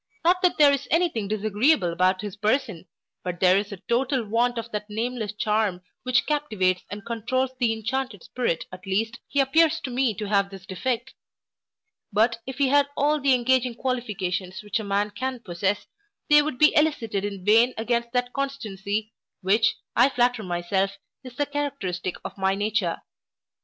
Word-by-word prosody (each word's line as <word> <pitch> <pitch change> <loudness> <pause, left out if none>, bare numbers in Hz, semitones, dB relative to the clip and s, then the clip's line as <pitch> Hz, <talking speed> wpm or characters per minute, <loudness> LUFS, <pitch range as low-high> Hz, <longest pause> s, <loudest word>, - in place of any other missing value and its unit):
Not 360 +2 +4
that 360 -2 +2
there 295 -2 +7
is 275 - -2
any 345 +2 +3
thing 220 -9 -4
disagreeable 215 - +2
about 185 +2 +2
his 205 -3 -6
person, 215 -4 -1 0.4
but 180 -2 -4
there 185 0 +5
is 200 +1 0
a 200 - -6
total 250 0 +1
want 235 +3 +1
of 230 0 -5
that 210 0 -4
nameless 225 0 -3
charm 210 -4 0 0.2
which 255 0 +2
captivates 215 -12 0
and 205 +1 -7
controuls 255 +3 -1
the 240 -3 +2
inchanted 225 -1 -3
spirit 235 -10 -2
at 185 +1 -11
least, 225 +4 -1
he 280 - -1
appears 320 +4 +4
to 260 - -5
me 245 -3 +1
to 215 - -4
have 200 -1 +2
this 195 -1 -11
defect; 240 +7 -3 1.0
but 225 +3 +2
if 265 - -6
he 280 -2 +2
had 285 0 +4
all 295 +1 +2
the 270 -1 +4
engaging 250 0 +1
qualifications 205 -8 -3
which 210 +2 -1
a - - -4
man 200 +1 0
can 255 +4 -3
possess, 195 -1 -2 0.5
they 295 0 +8
would 295 -3 -3
be 305 +2 +5
excited 235 -10 +1
in 200 -3 -5
vain 230 +4 +5
against 235 +1 -1
that 245 0 -1
constancy, 220 -6 -3 0.3
which, 210 +4 +3 0.2
I 265 - +5
flatter 245 -2 +1
myself, 190 +2 -1 0.3
is 255 -2 -10
the 290 - 0
characteristic 275 -12 -3
of - - -7
my 190 0 +2
nature. 205 -4 -1
225 Hz, 175 wpm, -25 LUFS, 200-260 Hz, 1.0 s, they